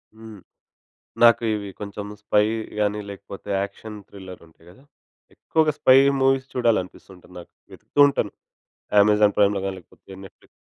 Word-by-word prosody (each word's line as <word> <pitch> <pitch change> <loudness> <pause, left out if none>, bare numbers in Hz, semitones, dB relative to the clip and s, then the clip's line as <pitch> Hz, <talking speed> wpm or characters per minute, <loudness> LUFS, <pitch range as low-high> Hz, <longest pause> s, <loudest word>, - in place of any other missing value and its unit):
హ్మ్. 110 -2 -12 0.8
నాకు 120 0 +6
ఇవి 100 -1 -5
కొంచెం 100 0 -7 0.2
స్పై‌గాని 105 0 -1
లేకపోతే 100 0 -11
యాక్షన్ 105 +2 -8
థ్రిల్లర్ 95 -2 -12
ఉంటాయి 80 +1 -24
కదా. 115 +9 -20 0.5
ఎక్కువగా 155 -2 0
స్పై 130 - +6 0.3
మూవీస్ 135 0 +1
చూడాలి 120 -4 +2
అనిపిస్తుంటుంది 90 0 -16
నాకు. 85 - -17 0.2
వెతుకుతూ - - -4
ఉంటాను. 110 -7 -3 0.7
అమెజాన్ 105 0 +3
ప్రైమ్‌లో‌గాని 100 -2 +1
లేకపోతే 95 - -21
నెట్‌ఫ్లిక్స్ 95 - -17
105 Hz, 125 wpm, -22 LUFS, 100-115 Hz, 0.8 s, నాకు